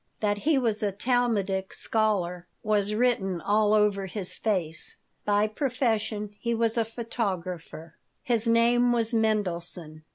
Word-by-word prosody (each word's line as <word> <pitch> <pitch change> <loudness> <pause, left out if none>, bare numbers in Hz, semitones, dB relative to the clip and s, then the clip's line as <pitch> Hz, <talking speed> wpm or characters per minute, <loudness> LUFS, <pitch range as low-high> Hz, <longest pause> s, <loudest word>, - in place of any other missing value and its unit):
That 205 -1 0
he 300 +6 +2
was 225 -5 +1
a 205 -2 +1
Talmudic 205 -4 0
scholar 185 -5 0 0.2
was 210 -1 +1
written 210 -7 +1
all 210 +4 +2
over 210 -2 +2
his 190 -1 -2
face. 175 -7 -2 0.3
By 205 0 +3
profession 215 -4 -1
he 235 -1 -1
was 230 -1 +1
a 230 - +2
photographer. 185 -8 -5 0.3
His 235 -2 0
name 240 +1 +4
was 230 0 +1
Mendelson. 180 -7 -1
210 Hz, 130 wpm, -27 LUFS, 190-230 Hz, 0.3 s, name